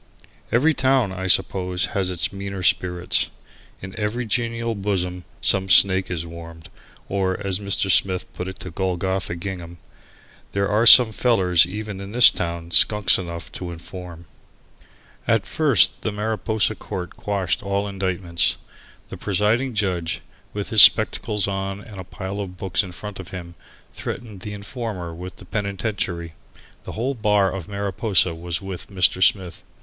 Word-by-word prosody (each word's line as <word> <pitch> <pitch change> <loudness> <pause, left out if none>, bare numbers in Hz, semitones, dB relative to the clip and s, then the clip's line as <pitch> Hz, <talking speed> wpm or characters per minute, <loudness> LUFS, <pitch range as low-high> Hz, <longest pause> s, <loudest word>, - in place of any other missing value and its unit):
Every 145 +7 +3
town, 130 -7 +1
I 95 0 -5
suppose, 90 0 +1
has 95 -2 0
its 90 +1 -2
meaner 100 -1 -6
spirits. 90 0 +1 0.5
In 95 +1 -8
every 110 +4 -2
genial 115 +1 -2
bosom 90 -3 -3 0.2
some 95 0 +2
snake 95 0 +6
is 85 -2 -4
warmed, 85 -1 -11 0.4
or, 95 -1 -1
as 95 -1 0
Mr. 100 -1 0
Smith 95 0 +2
put 90 - -6
it 95 0 -8
to 90 - -7
Golgotha 95 0 -2
Gingham 85 -1 -7 0.8
"there 100 0 0
are 105 +3 +2
some 120 -1 +10
fellers 95 -7 +3
even 105 +1 -6
in 100 +2 -9
this 120 -1 +9
town 85 -1 -5
skunks 105 0 +5
enough 85 -2 -7
to 90 - -6
inform." 85 0 -10 1.0
At 115 -4 +2
first 115 - +2
the 110 - -2
Mariposa 110 +1 -1
court 95 -5 -7
quashed 100 -4 -2
all 100 0 -2
indictments. 95 -3 -1 0.5
The - - -8
presiding 110 +6 0
judge, 90 -5 -2 0.3
with - - -5
his - - +9
spectacles 105 -2 +5
on 95 0 -4
and 105 -2 -12
a - - -6
pile 95 +2 -7
of 95 -3 -6
books 95 -1 -1
in 95 -3 -8
front 100 +3 -9
of 95 - -8
him, 85 -2 -8 0.4
threatened 110 -5 -7
the 105 +3 -7
informer 100 -4 -6
with 90 +2 -9
the 95 - -14
penitentiary. 95 -4 -4 0.5
The - - -7
whole 125 +5 -2
bar 105 -5 +1
of 95 -3 -6
Mariposa 100 -2 0
was 85 +1 -5
with 95 -2 -7
Mr. 95 -2 +2
Smith. 95 -2 +2
95 Hz, 155 wpm, -22 LUFS, 90-105 Hz, 1.0 s, some